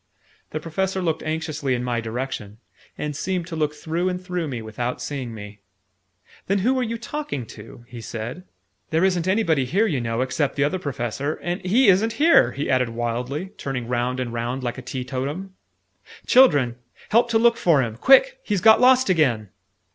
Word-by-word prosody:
The 155 - -4
Professor 190 +4 -2
looked 165 -4 -1
anxiously 155 -4 -2
in 120 - -3
my 120 -1 -1
direction, 115 -2 -5 0.4
and 150 -1 -4
seemed 180 +3 -2
to 170 -1 -7
look 150 -1 -1
through 165 +4 -2
and 180 0 -3
through 180 -3 -3
me 125 -4 -4
without 115 +3 -4
seeing 125 -1 -5
me. 105 -1 -10 0.9
"Then 195 - +2
who 260 +1 +2
are - - +1
you 230 -1 -3
talking 265 - -5
to?" 115 +2 -13
he 120 -2 -9
said. 120 +10 -6 0.5
"There 165 +2 +1
isn't 180 -2 +1
anybody 185 -8 +2
here, 190 - +1
you 150 - -1
know, 115 +1 -2
except 135 +2 -1
the 140 - +1
Other 180 +6 0
Professor 135 0 -3
and 175 +2 -3
he 225 +8 +3
isn't 205 +4 +4
here!" 310 +8 +5
he 140 - -3
added 130 -2 +2
wildly, 120 +9 -3
turning 125 -4 -4
round 125 +1 -1
and 120 -2 -3
round 120 +3 -3
like 120 +1 -3
a - - -7
teetotum. 135 +9 -5 0.7
"Children! 145 - +5 0.3
Help 235 +2 +3
to 230 - +3
look 235 +1 +4
for 165 - +3
him! 115 -2 -4
Quick! 485 - +5
He's 205 - -1
got 220 +3 +6
lost 255 +1 +5
again!" 130 - +2
150 Hz, 185 wpm, -23 LUFS, 125-190 Hz, 0.9 s, got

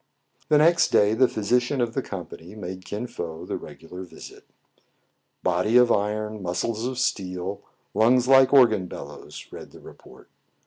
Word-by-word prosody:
The 150 - +5
next 170 +3 +4
day 105 +1 +3
the 130 +3 +4
physician 125 +6 0
of 120 -2 0
the 135 - -1
company 90 -2 -9
made 95 -2 -8
Kin 105 +6 -5
Fo 85 -9 -7
the - - -4
regular 90 +3 -10
visit. 90 - -12 0.5
" - - -48
Body 90 +6 +2
of 125 -1 +5
iron, 105 +1 -1
muscles 110 +6 -2
of 130 -1 -5
steel, 95 -6 -2 0.3
lungs 120 +4 +3
like 135 -1 +6
organ 110 -9 +5
bellows," - - -10
read - - -10
the - - -15
report. - - -16
110 Hz, 160 wpm, -24 LUFS, 95-125 Hz, 0.5 s, like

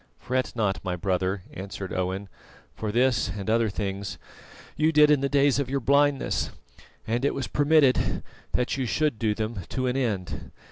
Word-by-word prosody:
"Fret 130 0 -2
not, 100 -4 0
my 90 -2 -2
brother," 95 +1 -1
answered 95 0 -6
Owen, 95 +2 -2 0.5
"for 110 -1 -3
this 125 +2 +2
and 100 -2 -5
other 115 -1 +3
things 100 -1 -4 0.6
you 155 +1 +3
did 150 -1 +6
in 145 -2 +4
the 140 - 0
days 140 -1 +3
of 140 -3 -1
your 140 +1 0
blindness, 140 +2 +2 0.6
and 120 +3 -1
it 140 - +1
was 135 - -2
permitted 145 -3 +3 0.3
that 125 +2 0
you 130 -2 -1
should 150 -3 0
do 110 -2 +1
them 110 0 -3
to 130 - -2
an 125 0 0
end. 105 -9 -2
120 Hz, 175 wpm, -26 LUFS, 100-140 Hz, 0.6 s, did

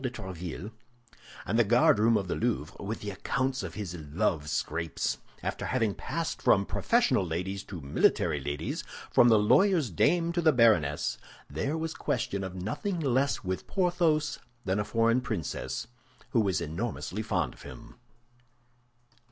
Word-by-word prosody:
de 130 - -1
Tréville 95 -3 -7 0.7
and 115 +5 +1
the - - +7
guardroom 115 0 +4
of 95 - -2
the - - -1
Louvre 110 -9 -1
with 105 +3 -4
the 105 - -4
accounts 130 +7 -1
of 90 -4 -6
his 100 -5 -5
love 75 -1 -1
scrapes, 80 +1 -2 0.2
after - - -3
having 115 -5 +1
passed 165 +9 -4
from 100 -1 +4
professional 240 - +2
ladies 90 +4 -3
to 95 - -7
military 75 +2 +2
ladies, 70 +1 -3 0.3
from 120 - +6
the 110 - +6
lawyer's 160 - +4
dame 170 - +2
to 175 0 0
the 160 -1 +5
baroness, 110 - +3 0.3
there 135 - -2
was 160 0 -3
question 100 0 -2
of 95 -1 -5
nothing 115 - -3
less 135 -2 +1
with 95 0 -3
Porthos 175 -5 +1 0.3
than 95 +2 0
a - - +1
foreign 115 +3 +2
princess, 110 - -3 0.5
who 120 - +3
was 95 -6 0
enormously 95 +4 -3
fond 110 - -1
of - - -17
him. - - -11
105 Hz, 150 wpm, -29 LUFS, 90-130 Hz, 0.7 s, the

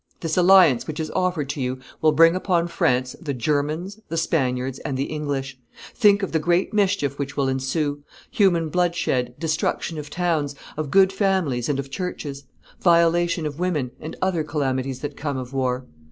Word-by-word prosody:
This 165 -2 -1
alliance 180 -8 +5
which 155 0 -5
is 155 -1 -3
offered 180 -6 0
to 140 -1 -3
you 130 0 -2 0.2
will 155 - +5
bring 165 +3 +5
upon 175 -2 +1
France 125 -6 0
the 145 -5 -3
Germans, 150 - -1
the 165 - -3
Spaniards, 130 -5 0
and 140 -4 -4
the 135 - 0
English; 140 -3 -4 0.3
think 205 -3 +4
of 195 - -2
the 160 - +1
great 175 +6 +1
mischief 195 -9 +1
which 140 0 -4
will 140 -1 +1
ensue 145 +3 -1 0.3
human 175 -6 +2
bloodshed, 170 -8 0
destruction 160 0 -1
of 150 -1 -7
towns, 155 -4 -1 0.2
of 155 -2 -3
good 195 +2 +5
families 185 - 0
and 145 - +1
of 140 0 -5
churches, 145 -5 -5 0.3
violation 170 -1 +3
of 150 0 -5
women, 155 -9 -1
and 155 - -7
other 180 -4 +1
calamities 135 -3 -2
that 145 - -5
come 145 -2 -3
of 130 0 -6
war. 130 -1 -1
155 Hz, 175 wpm, -23 LUFS, 135-175 Hz, 0.3 s, alliance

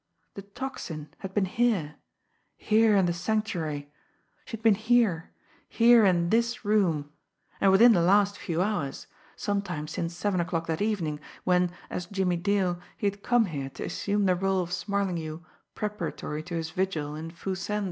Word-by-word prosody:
The 200 - -7
Tocsin 200 - -6
had 190 -1 -7
been 205 -2 +3
here 190 -8 0 0.6
here 220 0 +3
in 195 -2 +4
the 175 - +1
Sanctuary! 170 -7 -2 0.5
She 225 - -6
had 220 - -24
been 225 -2 +6
here 220 -5 +2 0.4
here 235 -1 +6
in 170 -3 +3
this 235 0 +1
room 170 -9 +1 0.5
and 195 - +5
within 230 +5 +7
the 180 -6 +4
last 200 +3 +4
few 170 -1 -1
hours 190 -10 -2 0.3
sometime 180 -7 -2
since 165 +2 -4
seven 185 +1 0
o'clock 165 -1 -2
that 165 +1 -2
evening, 180 -9 -1 0.2
when, 180 -1 +3 0.2
as 180 - -4
Jimmie 185 -2 0
Dale, 180 -1 0 0.2
he - - -4
had 200 0 -1
come 240 0 +3
here 140 -7 -4
to - - -8
assume 205 +1 -1
the 185 - +4
role 190 0 +1
of 175 0 -6
Smarlinghue 175 -3 -2 0.3
preparatory 210 -7 -4
to 175 - -5
his 160 -1 -3
vigil 160 -5 -2
in 160 +1 -6
Foo 175 +3 -5
Sen's! 210 +3 -2
185 Hz, 165 wpm, -27 LUFS, 165-205 Hz, 0.6 s, within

